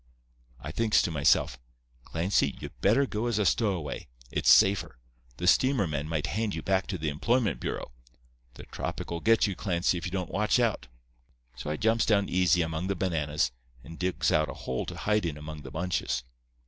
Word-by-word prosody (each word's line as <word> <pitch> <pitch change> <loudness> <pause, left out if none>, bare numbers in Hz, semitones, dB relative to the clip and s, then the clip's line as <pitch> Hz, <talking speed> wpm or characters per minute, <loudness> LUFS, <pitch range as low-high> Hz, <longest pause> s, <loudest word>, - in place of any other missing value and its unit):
I 75 +5 -6
thinks 110 +4 +2
to 85 - -1
myself, 70 -4 +2 0.5
'Clancy, 85 +5 0
you - - -6
better 115 +8 +4
go 110 -1 -3
as 115 -3 0
a 105 - +1
stowaway. 90 -7 0 0.2
It's - - +1
safer. 95 -9 +4 0.4
The 90 - -3
steamer 130 +4 +4
men 75 -1 -3
might 80 -2 -1
hand 110 +1 -2
you - - -5
back 95 0 +1
to 95 - -3
the 80 -1 -2
employment 115 - 0
bureau. - - -4 0.6
The - - -10
tropic'll 85 - -5
get 115 +5 +4
you, 100 -3 -2
Clancy, 90 -2 0
if - - -7
you - - -7
don't 90 -3 -3
watch 105 +4 +2
out.' 115 - 0 0.7
"So 65 +4 -6
I 75 - -1
jumps 110 +1 +2
down 100 -2 +2
easy 90 -1 +3
among 80 +2 -3
the 100 - -1
bananas, 75 -7 0 0.3
and 80 +5 -11
digs 90 0 0
out 75 -1 +2
a - - -6
hole 65 - -4
to - - -6
hide 105 -1 +1
in 80 -4 -3
among 75 0 -8
the 65 - -9
bunches. 85 -4 -2
90 Hz, 190 wpm, -28 LUFS, 75-105 Hz, 0.7 s, better